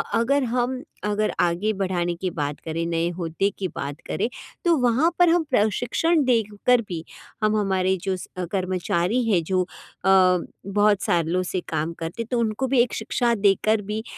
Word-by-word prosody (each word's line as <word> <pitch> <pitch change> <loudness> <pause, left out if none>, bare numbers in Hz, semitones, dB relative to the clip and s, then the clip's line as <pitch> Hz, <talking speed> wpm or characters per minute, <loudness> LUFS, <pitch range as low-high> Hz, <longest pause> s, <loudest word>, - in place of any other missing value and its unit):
अगर 265 +4 +2
हम 250 +2 -1 0.2
अगर 210 +1 0
आगे 175 +5 +1
बढ़ाने 175 -2 0
की 185 +2 -3
बात 145 -2 -3
करें, 165 +1 -2
नए 170 0 0
औहदे 175 +3 -1
की 190 - -1
बात 140 +1 -5
करें, - - -1 0.4
तो 340 -1 +5
वहाँ 250 +5 +3
पर 350 -1 +6
हम 340 -1 +3
प्रशिक्षण 245 - +2
देकर 230 0 +2
भी 165 -3 -4 0.4
हम 215 0 +3
हमारे 190 -2 +1
जो 190 -1 0
स - - -9 0.2
कर्मचारी 185 +3 0
हैं 180 -5 +3
जो 185 +2 +1
अ, 180 - -12 1.0
बहुत 205 0 +3
सालों 170 +1 +1
से 185 0 -3
काम 160 +1 -1
करते, 165 +8 -4
तो 240 +1 -2
उनको 230 +3 0
भी 260 -1 +2
एक 240 - 0
शिक्षा 235 +2 0
देकर 210 +1 +2
भी 210 +2 -4
205 Hz, 170 wpm, -24 LUFS, 175-235 Hz, 1.0 s, पर